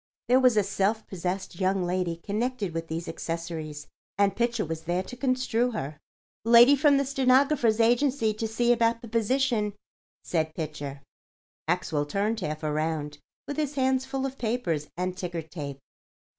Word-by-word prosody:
There 255 +1 +5
was 250 -4 +4
a 210 - +5
self 200 +3 0
possessed 185 -1 -4
young 190 0 +1
lady 175 -1 -1
connected 210 +2 -2
with 165 0 -4
these 165 +1 -4
accessories; 165 -3 -5 0.3
and 200 -1 +3
Pitcher 235 -2 0
was 160 0 -5
there 175 +2 0
to 250 - -9
construe 250 -2 0
her. 150 -6 -5 0.4
"Lady 235 +4 +8
from 285 0 +4
the 275 - +1
Stenographer's 260 -3 +3
Agency 240 0 +3
to 220 +1 -3
see 240 +2 +2
about 230 0 +1
the - - -7
position," 230 -1 +1 0.5
said 160 -2 -1
Pitcher. 145 -3 -5 0.6
Maxwell 160 -4 0
turned 210 +7 0
half 155 -4 -4
around, 150 -1 -2 0.3
with 285 - -4
his 295 -2 -1
hands 265 -1 +2
full 270 0 -2
of 270 0 -5
papers 200 -11 -1
and 180 0 -2
ticker 175 -3 -4
tape. 150 -4 -7
205 Hz, 155 wpm, -27 LUFS, 165-245 Hz, 0.6 s, Lady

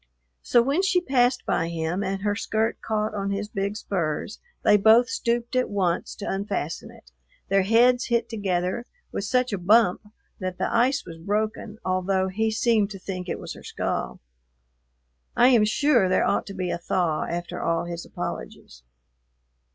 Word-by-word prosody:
So 240 - +4
when 280 +8 +1
she 385 -1 +3
passed 255 -5 +1
by 165 -1 0
him 170 +3 -2
and 195 0 -3
her 205 -1 +1
skirt 220 +2 -1
caught 215 -1 -1
on 200 -1 -2
his 200 +1 -2
big 200 +1 -2
spurs 180 -1 -3 0.2
they - - +6
both 220 +4 +6
stooped 235 0 -1
at 255 - +1
once 185 -4 -1
to 205 - -7
unfasten 195 -5 -3
it; - - -17 0.4
their 195 0 +4
heads 240 +5 +4
hit 235 -1 0
together 195 +1 -2 0.2
with 200 - -3
such 250 +2 +1
a 200 - -1
bump 210 +1 +3 0.3
that 185 -2 -4
the - - -1
ice 255 +4 +2
was 165 0 -10
broken, 210 +3 -2
although 185 +1 0
he 220 +4 0
seemed 220 -2 +2
to 200 - -7
think 185 -1 -6
it - - -2
was - - -7
her - - -12
skull. - - -3 1.2
I 245 - +6
am 235 -5 +5
sure 235 -3 +3
there 185 - +3
ought - - 0
to 195 - -7
be 185 -2 -2
a - - -3
thaw 175 -2 0
after 175 0 -4
all 165 0 0
his 170 0 -5
apologies. - - -7
205 Hz, 175 wpm, -25 LUFS, 185-235 Hz, 1.2 s, they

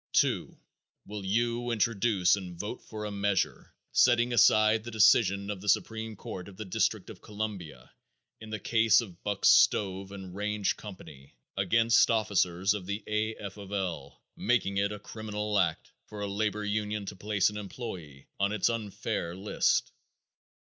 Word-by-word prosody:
2. - - +1 0.5
Will 105 -1 -7
you 120 +4 0
introduce 110 -4 +2
and 90 -3 -8
vote 105 +4 -5
for 105 -1 -7
a 105 - -4
measure 100 -1 -1 0.2
setting 120 0 +4
aside 110 -1 +5
the 120 - -7
decision 100 -2 +4
of 100 -2 -6
the 105 - -3
supreme 110 +2 0
court 90 -2 -7
of 95 -2 -13
the 110 - -6
District 95 - -1
of - - -13
Columbia 105 -6 -6 0.5
in 110 - -10
the 110 - -3
case 115 +1 +4
of 95 -6 -11
Buck 100 -2 -2
Stove 95 -1 +4
and 95 -2 -8
Range 105 0 -1
Company 75 - -12 0.2
against 115 +4 +4
officers 100 -4 +2
of 100 -3 -6
the 100 +2 -3
A. 110 +1 -1
F. 100 -1 -8
of 100 -1 -10
L., 85 -8 -4
making 105 -4 0
it 100 +1 +1
a 105 - -5
criminal 105 0 -3
act 85 -4 -1 0.2
for 105 -1 -8
a 100 - -2
labor 105 +1 -1
union 105 0 -2
to - - -6
place 100 +1 +1
an 105 - -7
employer 95 - -8 0.2
on 100 +1 +2
its 105 +2 +2
unfair 105 -5 -3
list? 100 +3 +1
105 Hz, 165 wpm, -29 LUFS, 95-110 Hz, 0.5 s, aside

